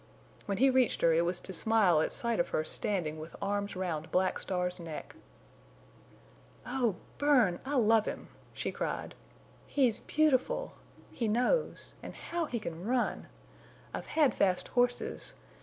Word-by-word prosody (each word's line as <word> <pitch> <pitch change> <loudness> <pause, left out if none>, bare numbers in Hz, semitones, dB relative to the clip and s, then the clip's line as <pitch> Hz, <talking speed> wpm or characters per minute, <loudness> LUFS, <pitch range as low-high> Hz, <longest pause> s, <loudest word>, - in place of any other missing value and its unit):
When 200 -1 -1
he 265 +4 +5
reached 255 -2 +2
her 165 -1 +5
it 165 +1 +3
was 175 +1 -1
to 190 - -5
smile 190 -4 +4
at - - 0
sight 235 -2 -1
of 175 - +1
her 155 - 0
standing 160 -3 -2
with 155 +2 -9
arms 200 0 -2
round 170 -4 -3
Black 185 0 +1
Star's 180 -1 -1
neck. 165 -3 -7 1.5
"Oh, 245 -5 0 0.2
Bern! 255 -12 +4
I 290 - -1
love 225 -3 +4
him!" - - -5 0.2
she - - -3
cried. - - -3 0.5
"He's 255 -6 +2
beautiful; 310 - +1 0.4
he 230 - -2
knows; 250 - 0
and - - -8
how 340 0 -3
he 245 -5 -3
can 170 -4 -6
run! 245 +3 0 0.7
I've - - -5
had 295 -7 +3
fast 185 -2 +1
horses. 245 0 0
210 Hz, 150 wpm, -31 LUFS, 180-250 Hz, 1.5 s, he